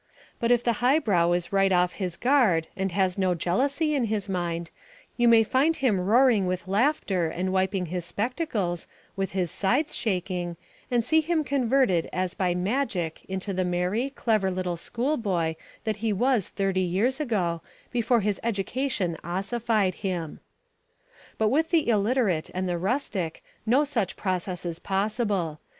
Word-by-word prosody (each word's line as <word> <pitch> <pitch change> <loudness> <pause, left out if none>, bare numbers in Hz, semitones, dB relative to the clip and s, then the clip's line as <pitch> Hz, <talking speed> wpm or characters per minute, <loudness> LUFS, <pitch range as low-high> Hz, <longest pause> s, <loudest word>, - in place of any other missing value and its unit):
But 230 - 0
if 245 -1 +4
the 235 - +2
highbrow 215 - +3
is 175 +2 -2
right 195 0 +3
off 180 -1 +3
his 180 -4 -4
guard 240 - +3
and 190 0 -1
has 190 +1 0
no 185 -2 +2
jealousy 275 - 0
in 270 -5 +1
his 210 -2 -2
mind, 170 -3 -3 0.4
you 240 -1 +3
may 230 -1 +7
find 270 +8 +2
him 240 -10 +1
roaring 220 0 +4
with 185 0 -3
laughter 200 - +1
and 185 +3 -2
wiping 190 0 +1
his 175 +1 -4
spectacles, 210 - -2 0.3
with 195 0 -3
his 180 -3 -1
sides 255 +10 0
shaking, 180 -4 -2 0.3
and 240 -3 +1
see 320 0 +4
him 320 0 0
converted 255 - +2
as 185 0 -1
by 180 -3 0
magic 185 - -1
into 190 +1 -3
the 185 0 0
merry, 180 +8 0
clever 215 -7 0
little 180 -1 -2
school 245 - -2
boy 175 -7 -1 0.3
that 215 -2 -1
he 220 +1 -1
was 235 0 +1
thirty 195 -2 0
years 200 - 0
ago, 185 - -1 0.3
before 235 -1 +2
his 205 0 -1
education 220 -3 -1
ossified 200 +2 0
him. 175 -6 -3 1.0
But 220 -1 +2
with 315 +6 +1
the 330 -3 +2
illiterate 215 -6 +1
and 185 0 -1
the 175 -1 -1
rustic 190 - -2 0.2
no 260 +6 +4
such 230 -10 -1
process 185 -2 -3
is 170 -1 -4
possible. 195 -5 -1
195 Hz, 160 wpm, -26 LUFS, 180-240 Hz, 1.0 s, may